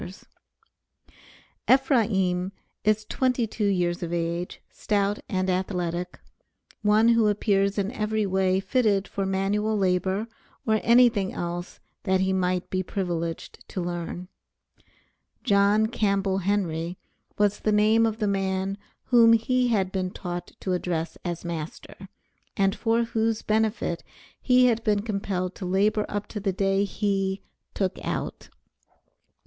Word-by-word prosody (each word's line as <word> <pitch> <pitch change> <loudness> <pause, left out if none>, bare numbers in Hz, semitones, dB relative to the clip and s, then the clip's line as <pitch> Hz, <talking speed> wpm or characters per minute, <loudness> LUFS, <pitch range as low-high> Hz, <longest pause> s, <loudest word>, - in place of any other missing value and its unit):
Ephraim 205 -9 +2 0.3
is 215 0 +2
twenty 250 -1 0
two 215 -1 -2
years 175 -3 0
of 170 -1 -4
age, 170 +1 -2
stout 205 -1 0
and 185 -1 0
athletic, 180 -1 -2 0.6
one 215 +2 +4
who 230 -2 +4
appears 200 -1 +1
in 200 +1 0
every 215 -3 -1
way 190 -1 +2
fitted 205 -3 +1
for 195 -1 -3
manual 205 +3 0
labor 190 +2 +1 0.4
or 220 -1 +2
anything 235 -5 +4
else 175 0 -5 0.2
that 190 0 +1
he 190 0 +1
might 185 -1 0
be 185 - 0
privileged 175 -3 -4
to - - -4
learn. 175 0 -4 1.2
John 200 +2 +4
Campbell 200 -4 0
Henry, 180 -3 -1 0.4
was 205 -1 +2
the 215 - 0
name 215 +2 +4
of 220 -1 -3
the 215 -2 0
man 195 0 -1 0.2
whom 230 -2 +6
he 250 +2 +2
had 195 -5 +1
been 185 -1 -1
taught 175 -1 -6
to 185 - -1
address 170 -2 -2
as 175 -1 -4
master, 170 +3 -7 0.5
and 195 0 +2
for 230 0 +1
whose 225 -1 -1
benefit 215 -5 0 0.4
he 250 -1 +5
had 230 -2 +2
been 205 -2 +1
compelled 195 -4 -2
to 185 - -5
labor 205 +3 +2
up 205 0 -3
to 210 - -5
the 195 -1 -1
day 195 +1 +1
he 195 -1 -1 0.3
"took 190 -2 -1
out." - - -4
195 Hz, 130 wpm, -26 LUFS, 185-215 Hz, 1.2 s, whom